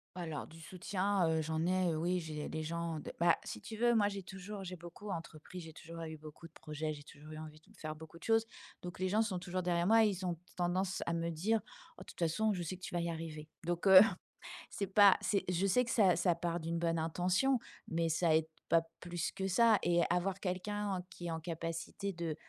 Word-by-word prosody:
Alors 165 -5 -4
du 165 0 -13
soutien, 190 +1 0
heu, 160 0 +2
j'en 160 +1 -1
ai, 185 0 +2
heu, 155 - -1
oui 180 +3 +1
j'ai 155 -2 -5
les 160 - -3
gens 165 0 -3
de - - -7
bah, 170 0 +5
si 105 - -6
tu 220 - -7
veux 240 +1 +4
moi 205 -2 +4
j'ai 200 -1 -5
toujours, 190 +2 -7
j'ai 185 0 -5
beaucoup 175 +4 -10
entrepris, 165 +1 -6
j'ai 160 -2 -9
toujours 165 0 -8
eu 160 -1 -6
beaucoup 155 +2 -11
de - - -28
projets, 155 0 -4
j'ai 145 - -9
toujours 150 +1 -13
eu 155 - -7
envie 155 -1 -9
de - - -22
faire 155 0 -4
beaucoup 160 +1 -12
de - - -16
choses. 225 0 +3 0.4
Donc 175 0 -7
les 185 0 +1
gens 215 +3 +3
sont 190 -5 -2
toujours 180 +1 -3
derrière 175 0 +1
moi 225 0 +7
et 210 - +4
ils 190 -1 -4
ont 175 -2 -1 0.2
tendance 185 +2 0
à 170 - +1
me 170 0 -1
dire: 210 +8 +1 0.4
«Oh, - - -11
de - - -9
toute - - -13
façon, 205 +6 +2
je 180 - -3
sais 175 +2 -4
que 185 - -21
tu - - -6
vas 175 - +1
y 170 - -1
arriver» 160 -2 -6
donc 175 +3 -1
heu, 190 -1 +11 0.7
c'est 200 - -2
pas 200 0 +7
c'est 200 - +1
je 180 +2 +1
sais 195 +6 +4
que 230 - -3
ça 195 -6 +5
ça 175 -3 +2
part 170 0 -2
d'une 165 +1 -2
bonne 165 -1 +1
intention, 180 +11 +2 0.3
mais 165 0 0
ça 165 0 +3
aide 160 0 +2 0.2
pas 165 0 +5 0.2
plus 175 -1 -3
que 190 0 -3
ça 225 +2 +5
et 175 0 +3
avoir 185 +2 0
quelqu'un 205 +3 -2
en - - -3
qui 175 - -9
est 170 - -2
en 160 - -2
capacité 165 +4 -4
de 165 -3 -3
175 Hz, 245 wpm, -35 LUFS, 160-190 Hz, 0.7 s, heu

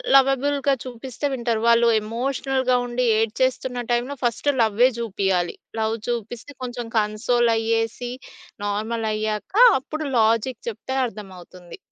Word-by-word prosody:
లవబుల్‌గా 275 +1 +3
చూపిస్తే 255 +2 -6
వింటారు. 235 -3 -1
వాళ్ళు 235 0 +5
ఎమోషనల్‌గా 255 +3 -1
ఉండి 245 +1 -1 0.2
ఏడ్చేస్తున్న 250 +2 -1
టైంలో 240 +4 0
ఫస్టు 245 +4 +1
లవ్వే 225 +3 +4
జూపియాలి. 190 -5 -1 0.2
లవ్ 220 0 0
చూపిస్తే 240 +3 -5
కొంచెం 245 -1 -5
కన్సోల్ 230 +3 +2
అయ్యేసి, 225 +2 -1 0.5
నార్మల్ 220 +2 -2
అయ్యాక 215 - -3 0.3
అప్పుడు 310 +3 -5
లాజిక్ 225 +2 +1
చెప్తే 235 +4 -6
అర్థమవుతుంది. 185 - -10
235 Hz, 110 wpm, -23 LUFS, 220-255 Hz, 0.5 s, వాళ్ళు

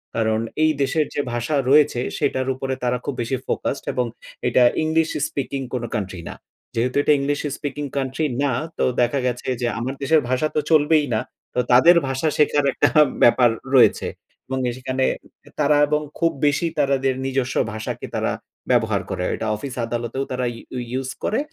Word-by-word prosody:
কারণ 110 -1 +1 0.2
এই 155 - +5
দেশের 150 +3 +1
যে - - +1
ভাষা 120 +5 -1
রয়েছে 145 -3 +5 0.2
সেটার 130 0 0
উপরে 130 0 -3
তারা 125 0 +1
খুব 145 - -2
বেশি 120 +3 -1
ফোকাসড 140 - -2
এবং 125 - 0 0.4
এটা 125 +1 +4 0.2
ইংলিশ 160 +1 +2 0.2
স্পিকিং 135 -1 -3
কোনো 125 -2 -2
কান্ট্রি 95 -4 -4
না। - - -7 0.4
যেহেতু 125 +2 0
এটা 150 - +5
ইংলিশ 145 +1 -1 0.2
স্পিকিং 145 -1 -4
কান্ট্রি 135 +3 -1 0.2
না 140 - +2 0.3
তো - - +1 0.2
দেখা 120 +3 +2
গেছে 125 0 -3
যে 120 - +1
আমার 125 +3 -2
দেশের 150 +3 +3
ভাষা 130 +4 +1
তো - - +3
চলবেই 155 0 +4
না। 110 - +2 0.3
তো - - 0
তাদের 145 +9 +7
ভাষা 135 +4 -1
শেখার 145 -1 +3
একটা - - +3 0.3
ব্যাপার 120 0 +6 0.3
রয়েছে 125 - +5 0.4
এবং 130 - -2 0.2
সেখানে 130 0 -2 0.6
তারা 150 0 +4
এবং 150 +1 +1 0.2
খুব 165 -1 +3 0.2
বেশি 145 +4 +1
তারা 140 -1 +3
দের 130 -1 +2
নিজস্ব 135 -1 -1 0.2
ভাষাকে 110 0 -5
তারা - - 0 0.4
ব্যবহার - - +2
করে। - - -3
এটা 110 - -4
অফিস 130 +5 -6
আদালতেও 120 +3 -3
তারা 125 0 -1
ইউ 125 +2 -8
ইউস 130 +1 -2
করে 220 - +1
130 Hz, 175 wpm, -22 LUFS, 125-145 Hz, 0.6 s, তাদের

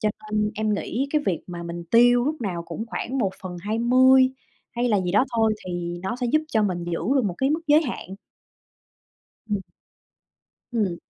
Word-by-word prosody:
Cho 215 - +2 0.2
nên 210 0 +1
em 215 -1 0
nghĩ 255 +6 -2
cái 300 -1 +2
việc 175 -5 0 0.3
mình 170 0 -6
tiêu 245 +1 +6
lúc 305 0 -2
nào 180 -6 -3
cũng 175 +7 -6
khoảng 260 +3 -4
1/20 235 +7 +3 0.4
hay 240 +1 0
là 210 -4 +3
gì 180 0 -2
đó 210 +6 +4
thôi, 220 -1 +3
thì 175 -1 -4
nó 190 +5 -2
sẽ 250 -1 -2
giúp 310 - +4
cho 220 -5 +2
mình 180 -4 -1
giữ 170 -1 -3 0.2
được 260 - +2
một 180 -4 -1 0.2
mức 315 - 0
giới 300 +2 +5
hạn. 245 -8 -5 1.4
Ừm. 205 -2 0 1.1
Ừm. 200 -7 0
215 Hz, 175 wpm, -24 LUFS, 185-245 Hz, 1.4 s, tiêu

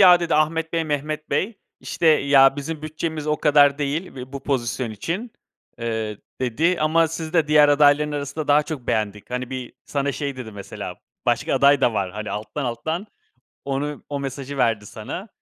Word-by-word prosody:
"Ya." 180 -2 +8
dedi 170 -1 0
"Ahmet 160 +1 +1
Bey, 165 -1 +1
Mehmet 150 +1 -3
Bey." 210 +3 -1 0.2
işte 170 - -2
"Ya 140 -3 +6
bizim 150 +2 -5
bütçemiz 155 0 -4
o 150 0 +1
kadar 145 -2 +5
değil 150 +4 -2
ve 130 0 -8
bu 140 -1 -6
pozisyon 125 -3 -1
için." 170 - -4 0.5
eee, 110 -3 -3 0.2
dedi 150 +9 +1
"Ama 160 +2 +3
sizi 160 0 -5
de 165 -4 +2
diğer 150 -1 +6
adayların 145 +1 +4
arasında 145 +1 -4
daha 145 +1 +5
çok 150 -5 -6
beğendik." 105 0 -2
Hani, 125 0 -3
bir, 130 -2 -5
sana 140 -1 -1
şey 140 -1 -4
dedi 120 -4 -7
mesela, 100 -1 -7 0.3
başka - - +1
aday 140 0 +5
da 125 - +3
var, 95 -3 -1
hani, 105 0 -5
alttan, 105 +7 -4
alttan, 160 - -3 0.6
onu, 140 +2 -3
o 145 -1 -3
mesajı 140 0 -5
verdi 115 -4 +1
sana. 115 - -7
145 Hz, 180 wpm, -23 LUFS, 125-155 Hz, 0.6 s, Ya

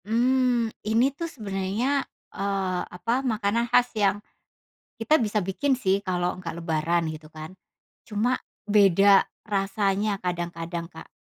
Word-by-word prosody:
Mmm, 240 0 +2
ini 230 +6 +2
tuh 335 +3 -5
sebenarnya, 215 +2 -1 0.3
eee, 195 -2 -1
apa, 230 +8 -1
makanan 230 -1 0
khas 245 +1 +4
yang 205 -2 +2 0.8
kita 285 +7 +2
bisa 210 -2 0
bikin 265 +9 0
sih, 195 -5 +1
kalau 180 -2 -2
nggak 165 -2 -6
lebaran, 165 +1 0
gitu, 155 0 -10
kan. 155 +2 -9 0.6
Cuma 230 +4 0 0.2
beda 200 -1 +5 0.2
rasanya 200 0 0
kadang-kadang, 170 -1 -3
Kak. 160 - -12
200 Hz, 125 wpm, -25 LUFS, 180-235 Hz, 0.8 s, beda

